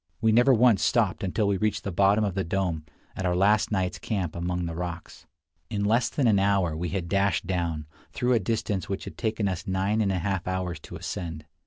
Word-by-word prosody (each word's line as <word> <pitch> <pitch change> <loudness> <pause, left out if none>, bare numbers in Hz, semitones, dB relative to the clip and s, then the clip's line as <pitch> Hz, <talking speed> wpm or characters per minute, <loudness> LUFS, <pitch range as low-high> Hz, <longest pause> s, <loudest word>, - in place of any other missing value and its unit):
We 110 0 +3
never 120 +4 +5
once 120 -4 +5
stopped 110 -6 +1
until 100 +3 0
we 100 -1 +1
reached 105 0 -1
the 100 - -3
bottom 100 +4 +3
of 100 -3 0
the 95 0 -1
dome, 85 -3 -2 0.3
at - - -4
our 90 -1 +1
last 105 +4 +3
night's 95 -3 -1
camp 95 -7 -3
among 90 +1 -2
the 85 - -4
rocks. 85 0 -6 0.4
In 100 -2 -1
less 115 +4 +2
than 140 - 0
an 105 -4 +4
hour 95 -5 +2
we 85 +2 -3
had 95 -3 -3
dashed 100 +2 +1
down, 85 -4 -2 0.3
through 125 +1 +1
a 120 - +4
distance 105 -3 -2
which 95 - -3
it - - -6
had - - -24
taken 110 -3 0
us 95 +2 -3
nine 95 +3 +1
and 100 -2 +1
a 95 - 0
half 95 0 -2
hours 90 -3 -2
to - - -10
ascend. 80 -3 -5
95 Hz, 225 wpm, -26 LUFS, 90-105 Hz, 0.4 s, never